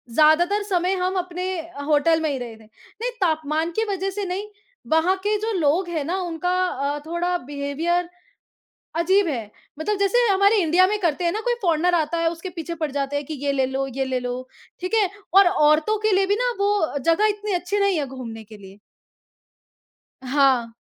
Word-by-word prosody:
ज़्यादातर 345 +7 +4
समय 370 -2 0
हम 370 +1 -1
अपने 360 0 -4 0.2
अ, 330 -3 -8
होटल 310 +2 +3
में 315 - 0
ही 275 - -2
रहे 240 -3 -7
थे। 220 - -18
नहीं, 440 - -8
तापमान 315 -1 0
की - - +2
वजह 390 -1 -1
से 400 +1 -4
नहीं। 380 +3 -4 0.4
वहाँ 320 +4 +3
के 420 +1 +1
जो 440 +2 -2
लोग 335 +4 +1
हैं 320 -4 -2
ना, 350 +5 -1
उनका 350 0 -3 0.2
अ, 285 -2 -2
थोड़ा 345 +2 -1
बिहेवियर 300 +5 -2 0.9
अजीब 375 +3 +3
है। 230 -8 -4 0.3
मतलब 410 +6 -1
जैसे 400 +4 +2
हमारे 400 +2 +4
इंडिया 350 +3 +4
में 420 +2 0
करते 340 0 0
हैं 340 - +2
ना, 425 - -2
कोई 485 +1 0
फ़ॉरेनर 350 0 +2
आता 325 0 0
है, 330 0 +2
उसके 340 +2 -7
पीछे 335 +1 -4
पड़ 310 -2 -2
जाते 280 0 -2
हैं 285 0 -2
कि, 315 - -6
"ये 280 - +2
ले 265 -1 +1
लो, 265 +1 -2
ये 270 0 0
ले 260 -1 -1
लो।" 250 +1 -5 0.3
ठीक 365 +4 -5
है, 410 -5 +3 0.2
और 390 0 +7
औरतों 315 +3 +3
के 435 0 +1
लिए 390 - +3
भी 405 - +2
ना, - - +1
वो 400 -7 +1
जगह 330 +9 +2
इतनी 415 0 -3
अच्छी 360 +3 -1
नहीं 400 -4 +2
है 290 - -1
घूमने 235 -4 -8
के 215 0 -13
लिए। 195 0 -14 1.4
हाँ। 260 -3 +2
335 Hz, 200 wpm, -23 LUFS, 285-380 Hz, 1.4 s, और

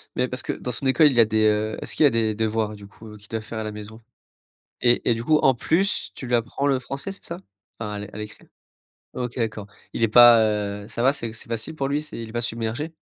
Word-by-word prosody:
Mais 125 0 +1
parce 125 +1 -5
que, - - -3
dans 125 - -5
son 135 - -5
école, 145 +3 +5
il 120 - +1
a 115 - +8
des, 110 0 +1
heu, 105 +1 +1
est-ce - - -6
qu'il 155 - +4
a - - +7
des 115 -2 +1
devoirs, 110 -1 -1
du 100 -1 -12
coup, 110 +2 -15
heu, 105 - -11
qu'il 105 +1 -18
doit 110 -1 -4
faire 110 0 -6
à - - -3
la 110 - -4
maison? 105 +2 -10 0.8
Et 120 0 +3
et - - +5
du 115 - -5
coup, 155 +4 +4
en 135 -3 +4
plus, 180 - 0
tu 130 - -7
lui 120 - +2
apprends 120 +4 -1
le 135 -2 +2
français, 135 +9 -6
c'est 195 - -12
ça, 170 - -6 0.4
enfin, 105 -2 -4
à - - -4
l 105 0 -7
à - - -8
l'écrire? 105 -1 -9 0.7
OK, 125 -1 -4
d'accord. 110 -4 -3 0.3
Il - - -4
est 115 - +4
pas, 120 +1 +8
heu, 105 -1 -2
ça 115 +2 -3
va, 135 - +5
c'est 120 -6 -4
c'est 115 - -7
facile 115 +6 -4
pour 135 -3 -2
lui, 145 +2 -1
c'est 150 - -7
il 115 - -7
est - - -11
pas 120 - -1
submergé? 120 +7 -3
115 Hz, 275 wpm, -24 LUFS, 110-130 Hz, 0.8 s, a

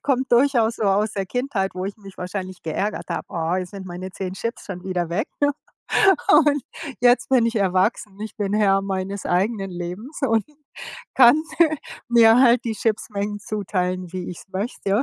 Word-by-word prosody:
kommt 265 -1 0
durchaus 240 -3 +3
so - - -4
aus 205 +2 +2
der 195 -1 -3
Kindheit, 245 -6 -2
wo 185 0 -4
ich 200 +2 -5
mich 195 -2 -14
wahrscheinlich 185 0 -5
geärgert 195 +6 -3
habe: - - -3
„Ah, 170 -1 -1
jetzt 185 -1 -4
sind 195 -2 -8
meine 180 +1 -6
10 185 0 -5
Chips 230 +4 -5
schon 180 -3 -7
wieder 180 -3 -2
weg.“ 210 - -2 1.0
Und 295 -3 +5 0.4
jetzt 245 0 +4
bin 255 -3 +4
ich 230 0 -1
erwachsen, 195 +1 0
ich 215 - -7
bin 205 -1 -1
Herr 195 -2 +3
meines 195 0 -3
eigenen 195 +2 0
Lebens 180 - -7
und 225 -4 +2 0.7
kann 265 +4 +7 0.2
mir 310 -3 +4 0.3
mir 230 0 +6
halt 245 -2 +5
die 225 - -1
Chips-Mengen 205 -2 -2
zuteilen, 185 -4 -3
wie 180 -1 -4
ich 180 - -7
es - - -14
möchte 200 +1 -1
200 Hz, 175 wpm, -22 LUFS, 185-230 Hz, 1.0 s, kann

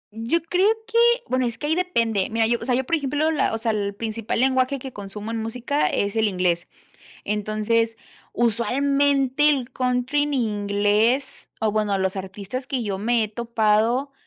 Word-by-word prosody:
Yo 245 +9 -1
creo 360 +4 +2 0.2
que 460 +1 -2 0.3
bueno, 255 -1 +1
es 235 - -2
que 295 - -5
ahí 320 - +2
depende. 230 - 0
Mira, 225 0 +1
yo, 235 +1 +1
o - - -5
sea, 250 -2 +1
yo, 260 - 0
por 330 - 0
ejemplo, 295 +2 0
la 300 - +1
o 225 - -1
sea, 225 0 -1
el 200 -1 -2
principal 225 +1 -3
lenguaje 260 +1 +2
que 265 0 -8
consumo 205 +2 -7
en 225 -1 -2
música 250 +6 -1
es 200 +2 -1
el 220 -1 +2
inglés, 180 -3 0 0.6
Entonces, 215 +2 0 0.4
usualmente 275 +4 +2
el 265 -4 0
country 255 +3 0
en 295 -1 -2
inglés 210 +3 0
o 215 -2 +2
bueno, 210 -2 +1
los 190 0 -1
artistas 200 +6 -6
que 260 -3 -2
yo 195 -3 -3
me 230 +1 +1
he - - -5
topado 230 +4 +1
235 Hz, 180 wpm, -23 LUFS, 210-270 Hz, 0.6 s, creo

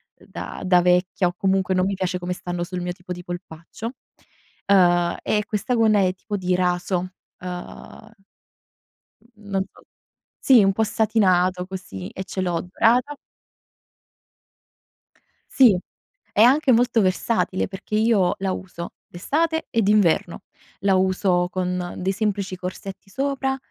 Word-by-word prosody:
ehm, - - -21
da - - -7
da 180 -1 +5
vecchia 180 +1 +2
o 175 - -3
comunque 190 -1 +1
non 185 0 +2
mi 195 - -1
piace 185 -1 -2
come 180 0 -5
stanno 175 -1 -4
sul 180 +1 -5
mio 180 0 -3
tipo 180 0 -12
di 180 0 -5
polpaccio. 175 +4 -7 0.8
Ehm, 175 -3 +4
e 210 0 0
questa 220 +4 -1
gonna 220 -2 +4
è 185 -1 +2
tipo 205 +2 -5
di 185 -1 0
raso, 180 0 -1 0.3
ehm, - - -11 1.9
mhmm, 205 -1 -15
non 195 -1 0
so - - -20 0.6
sì, 240 -7 +5
po' 220 - 0
satinato 185 -5 +2
così 140 - -7
e 190 - -6
ce 190 - -5
l'ho 175 -2 -1
dorata. 240 +9 +2 2.4
Sì, 240 -8 +6 0.6
è 210 - +4
anche 265 +3 +5
molto 235 0 +3
versatile 190 +1 0
perché 195 +2 -7
io 215 -4 +3
la 195 0 -1
uso 185 -2 -6
d'estate 320 - -1
e 230 - +1
d'inverno. 195 -5 +2 0.4
La 195 0 +3
uso 185 -1 +2
con 180 -1 -2
dei 185 +1 -1
semplici 200 -2 -2
corsetti 185 +2 -7
sopra, 270 +3 -1
190 Hz, 140 wpm, -23 LUFS, 180-215 Hz, 2.4 s, Sì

